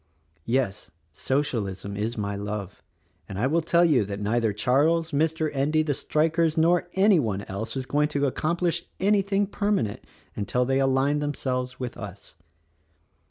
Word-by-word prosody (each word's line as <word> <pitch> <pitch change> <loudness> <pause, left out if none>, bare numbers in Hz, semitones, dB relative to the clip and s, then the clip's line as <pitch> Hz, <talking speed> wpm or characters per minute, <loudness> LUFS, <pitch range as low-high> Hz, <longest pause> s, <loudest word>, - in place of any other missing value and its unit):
Yes: 115 -7 -1 0.2
Socialism 100 - -2
is 110 +4 -2
my 100 -1 -2
love, 100 -1 -5 0.5
and 95 - -6
I 110 - +1
will 160 +5 +2
tell 170 +2 +3
you 145 -9 +4
that 100 0 -5
neither 110 +2 +1
Charles, 150 +10 +2
Mr. 155 +1 0
Endy, 150 +3 +2
the 150 -2 0
strikers 160 +3 +1
nor 175 +2 +3
any 195 -1 +5
one 105 -7 -1
else 105 +7 -5
is 130 - -3
going 150 +2 +1
to 145 -1 0
accomplish 170 +5 -1
anything 200 0 +2
permanent 200 - -1 0.3
until 115 +5 0
they 135 +1 +1
align 135 +2 +2
them 145 -1 -2
selves 125 -1 -3
with 125 -2 -5
us. 100 -2 -9
135 Hz, 155 wpm, -26 LUFS, 110-160 Hz, 0.5 s, any